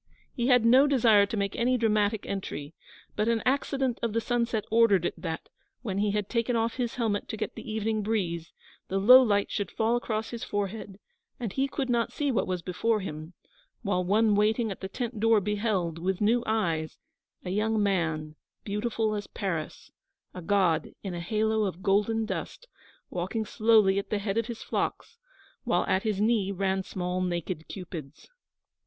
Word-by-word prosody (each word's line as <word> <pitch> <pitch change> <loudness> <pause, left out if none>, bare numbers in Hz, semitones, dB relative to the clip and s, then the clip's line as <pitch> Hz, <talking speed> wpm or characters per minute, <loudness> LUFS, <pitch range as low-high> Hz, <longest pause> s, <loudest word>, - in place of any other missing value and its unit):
He 240 -2 -1
had 250 -3 +5
no 260 +5 +6
desire 225 -7 +5
to 220 - -4
make 200 -1 -1
any 250 +2 +2
dramatic 215 -2 +1
entry, 160 -6 -5 0.4
but 210 +1 0
an 230 -2 +1
accident 270 -1 0
of 230 -2 -1
the 230 - +2
sunset 235 -2 -1
ordered 220 -6 +4
it - - 0
that, 160 -2 -5 0.4
when 200 -4 -2
he 210 0 +2
had 205 -1 -1
taken 235 +1 0
off 230 +1 0
his 240 -3 -2
helmet 220 -4 -1
to 220 - -5
get 215 - -3
the - - -8
evening 220 0 -1
breeze, 180 -6 -2 0.4
the 195 - -1
low 250 +7 +9
light 205 -5 +1
should 205 -4 -2
fall 225 +2 +1
across 225 -2 -2
his 235 -1 -5
forehead, 205 -1 -4 0.4
and 225 -6 -4
he 270 +1 +1
could 275 -1 -3
not 235 -2 +1
see 290 -2 -1
what 235 - 0
was 180 -2 -2
before 215 +4 0
him; 155 -1 -7 0.5
while 195 -4 0
one 210 +4 +3
waiting 215 +2 +2
at 195 - -7
the 190 - -3
tent 235 0 -4
door 225 0 +4
beheld, 200 -5 -1
with 185 +2 -1
new 230 +3 +3
eyes, 170 -8 -1 0.5
a 180 - -3
young 215 +2 +1
man, 160 -6 -1 0.3
beautiful 215 +1 -1
as 205 -1 -4
Paris, 170 -6 -4 0.4
a 180 - -7
god 175 -4 +1
in 195 -3 -4
a 175 - -4
halo 220 +3 0
of 190 -1 -5
golden 210 +3 +2
dust, - - -5 0.4
walking 190 +6 -2
slowly 215 -3 +4
at 200 - -6
the 210 - 0
head 200 +1 -1
of 230 - -2
his 230 -2 -6
flocks, 465 - -3 0.4
while - - +1
at 190 0 +1
his 210 -3 -1
knee 210 -2 +2
ran 190 0 0
small 180 -1 -3
naked 175 -2 -3
Cupids. 170 - -9
210 Hz, 185 wpm, -28 LUFS, 190-230 Hz, 0.5 s, low